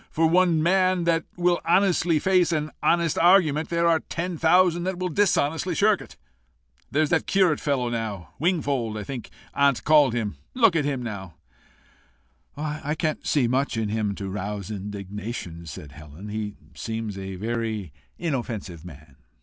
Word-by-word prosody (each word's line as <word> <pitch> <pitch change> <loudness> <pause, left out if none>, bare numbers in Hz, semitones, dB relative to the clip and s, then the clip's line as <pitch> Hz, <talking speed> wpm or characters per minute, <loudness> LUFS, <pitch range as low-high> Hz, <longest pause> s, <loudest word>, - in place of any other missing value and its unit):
For 165 - +1
one 170 -1 +3
man 185 0 +3
that 165 -1 +1
will 175 0 +2
honestly 175 -2 +3
face 180 0 +3
an 155 -1 -1
honest 170 -2 +2
argument, 165 -4 +4
there 170 0 +1
are 165 -1 +4
ten 170 +3 -4
thousand 175 +2 +3
that 190 -1 -2
will 185 0 -2
dishonestly 170 -2 +1
shirk 205 +1 +3
it. - - -13 0.7
There's 155 +1 +1
that 160 - +1
curate 185 -6 +3
fellow 135 -4 0
now 110 -6 -4
Wingfold 140 - 0
I 105 - -4
think 125 +2 -7 0.2
aunt 140 -6 +2
called 145 -5 +5
him 110 -4 -2 0.2
look 225 -8 +4
at 150 -3 +1
him 135 -3 -2
now!" 95 -7 -6 1.2
"I 150 0 -3
can't 155 -1 -2
see 135 -5 +2
much 130 0 0
in 110 -2 -1
him 105 -2 -1
to 100 - -5
rouse 100 +1 -4
indignation," 100 -3 -6
said 75 -1 -9
Helen. 75 +6 -11
"He 105 -1 -4 0.2
seems 110 +7 -4
a 95 0 -6
very 110 -4 -3 0.2
inoffensive 115 - -4
man." 75 -5 -13
140 Hz, 160 wpm, -25 LUFS, 105-170 Hz, 1.2 s, called